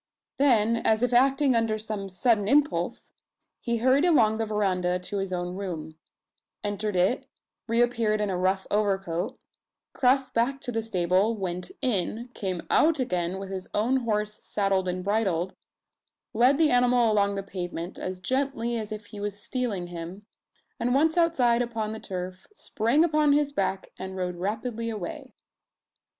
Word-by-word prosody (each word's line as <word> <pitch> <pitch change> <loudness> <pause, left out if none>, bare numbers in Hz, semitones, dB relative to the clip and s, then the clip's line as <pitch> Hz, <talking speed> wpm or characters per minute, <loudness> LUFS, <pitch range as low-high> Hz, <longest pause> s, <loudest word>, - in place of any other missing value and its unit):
Then, 230 -5 +4
as 220 0 +1
if 245 0 +1
acting 270 +2 +4
under 225 -2 +1
some 210 -2 -4
sudden 210 +2 +1
impulse, 295 +5 +1 0.5
he 235 -1 -1
hurried 260 +5 +3
along 225 -11 +4
the 225 - -1
verandah 185 -4 0
to 180 +3 -5
his 195 -1 -2
own 175 0 -2
room; 175 -5 -5 0.7
entered 205 0 -2
it; 185 +9 +1 0.4
reappeared 230 -2 +2
in 210 -2 0
a - - -1
rough 190 +1 0
overcoat; 195 +1 0 0.6
crossed 260 +1 +2
back 250 +4 +1
to 245 - -5
the 225 -1 -1
stable; 190 +1 +1
went 180 -3 -4
in; 235 0 -1
came 185 -4 -4
out 315 -1 +4
again 180 -6 -1
with 195 0 -7
his 190 -1 -5
own 235 +6 +2
horse 210 -3 -2
saddled 195 -2 0
and 180 0 -2
bridled; 190 -4 0 0.8
led 250 +5 +4
the 315 -2 +4
animal 245 -2 +4
along 200 -1 +2
the 195 - -3
pavement, 175 -2 -5
as 185 0 -4
gently 245 0 -1
as 215 -1 -6
if 215 0 -6
he 205 0 -10
was 205 0 -4
stealing 215 -5 -2
him; 175 +3 -8 0.5
and 245 +2 +1
once 320 +3 +3
outside 260 -9 +3
upon 225 -3 -2
the 220 - -6
turf, 185 -1 -6
sprang 240 - +1
upon 305 -3 +3
his 290 0 +2
back, 195 -6 -2
and 190 0 -6
rode 180 -1 -3
rapidly 225 +5 -3
away. 210 -6 -6
215 Hz, 160 wpm, -27 LUFS, 190-245 Hz, 0.8 s, Then